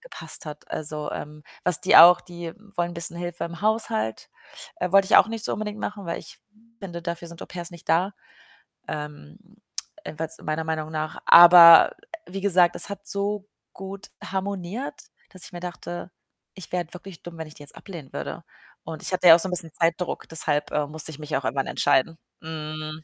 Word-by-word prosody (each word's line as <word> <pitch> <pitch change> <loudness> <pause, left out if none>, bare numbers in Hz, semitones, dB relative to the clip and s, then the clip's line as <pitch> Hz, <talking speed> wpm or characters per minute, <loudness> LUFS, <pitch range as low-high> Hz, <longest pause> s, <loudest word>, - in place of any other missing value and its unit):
gepasst - - -9
hat. 150 0 -10
Also, 150 -1 -4
ähm, 150 0 -7 0.2
was 180 -4 +2
die - - +4
auch 175 +2 +10
die 175 -2 -8 0.2
wollen 175 0 -1
bisschen 170 0 -5
Hilfe 175 0 -4
im 170 +1 -8
Haushalt. 210 - -1 0.5
Äh, 180 - -3
wollte 195 -1 +6
ich - - +5
auch 210 - +6
nicht 225 -1 -5
so - - -1
unbedingt 210 0 -5
machen, 205 -3 -5
weil 170 - -3
ich - - -12 0.4
finde, 175 -4 -7
dafür 170 -1 -5
sind 170 0 -12
Au-pairs 175 0 -7
nicht 170 - -14
da, 180 +5 +2 0.8
ähm, 150 - -7 0.7
jedenfalls 160 +1 -5
meiner 155 +1 -2
Meinung 155 -1 -3
nach. 155 0 -4
Aber 170 -1 +10 0.4
wie 195 +2 -6
gesagt, 180 -3 +3
das - - -3
hat 200 0 -8
so 200 0 -2 0.3
gut 195 +1 -9
harmoniert, 195 +5 -4 0.4
dass 185 - -6
ich - - -12
mir 175 - -6
dachte: 175 0 -7 0.4
„Ich 190 -4 -11
wäre 180 -1 0
halt 160 - -18
wirklich 180 -1 -11
dumm, 175 -1 -10
wenn 160 - -5
ich 155 - -14
die 145 - -12
jetzt 145 - -10
ablehnen 165 -8 -11
würde.“ - - -6 0.4
Und 160 -1 -7
ich - - -4
hatte 180 -1 +3
ja 165 - +11
auch - - +2
so 180 - +1
'n - - -6
bisschen 170 -3 -5
Zeitdruck, 170 +1 -1
deshalb, 150 -2 -1
äh, 150 -1 0
musste 155 +1 -3
ich 150 - -10
mich 150 0 -4
auch 135 - -5
irgendwann 135 +4 -1
entscheiden, 160 +5 +1 0.3
hm. 155 0 -6
170 Hz, 195 wpm, -24 LUFS, 155-185 Hz, 0.8 s, ja